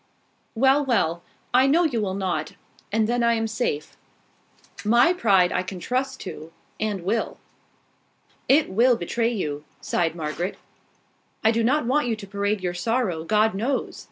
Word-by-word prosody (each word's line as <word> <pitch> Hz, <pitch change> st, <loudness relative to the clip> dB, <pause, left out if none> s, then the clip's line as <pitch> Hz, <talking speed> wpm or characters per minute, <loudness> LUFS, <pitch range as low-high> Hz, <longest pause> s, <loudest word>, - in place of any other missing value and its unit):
"Well, 270 Hz, +5 st, +4 dB
well! 175 Hz, -, +1 dB, 0.3 s
I 260 Hz, +2 st, +5 dB
know 325 Hz, +6 st, +4 dB
you 255 Hz, -9 st, 0 dB
will 190 Hz, -2 st, -2 dB
not: 180 Hz, -6 st, -2 dB, 0.4 s
and 220 Hz, +1 st, +2 dB
then 240 Hz, +1 st, 0 dB
I 235 Hz, 0 st, +3 dB
am 225 Hz, 0 st, -1 dB
safe. 220 Hz, -9 st, -3 dB, 0.9 s
My 235 Hz, +11 st, +4 dB
pride 195 Hz, -, +3 dB
I 180 Hz, -, +1 dB
can 185 Hz, 0 st, -7 dB
trust 260 Hz, +7 st, -2 dB
to, 155 Hz, +2 st, -8 dB, 0.3 s
and 210 Hz, -3 st, -2 dB
I -, -, -13 dB
will." 215 Hz, +5 st, -1 dB, 1.1 s
"It 285 Hz, +4 st, +5 dB
will 235 Hz, +5 st, +4 dB
betray 230 Hz, +6 st, -1 dB
you," 150 Hz, -9 st, -3 dB, 0.2 s
sighed 165 Hz, -1 st, -1 dB
Margaret. 165 Hz, +3 st, -3 dB, 0.9 s
"I 220 Hz, -, +5 dB
do 230 Hz, 0 st, 0 dB
not 265 Hz, +4 st, +2 dB
want 265 Hz, +2 st, +1 dB
you 230 Hz, -, 0 dB
to 215 Hz, -, -9 dB
parade 200 Hz, +1 st, -1 dB
your 180 Hz, -1 st, -2 dB
sorrow, 185 Hz, -3 st, -1 dB
God 215 Hz, +4 st, +2 dB
knows! 240 Hz, +7 st, -2 dB
220 Hz, 160 wpm, -24 LUFS, 185-245 Hz, 1.1 s, I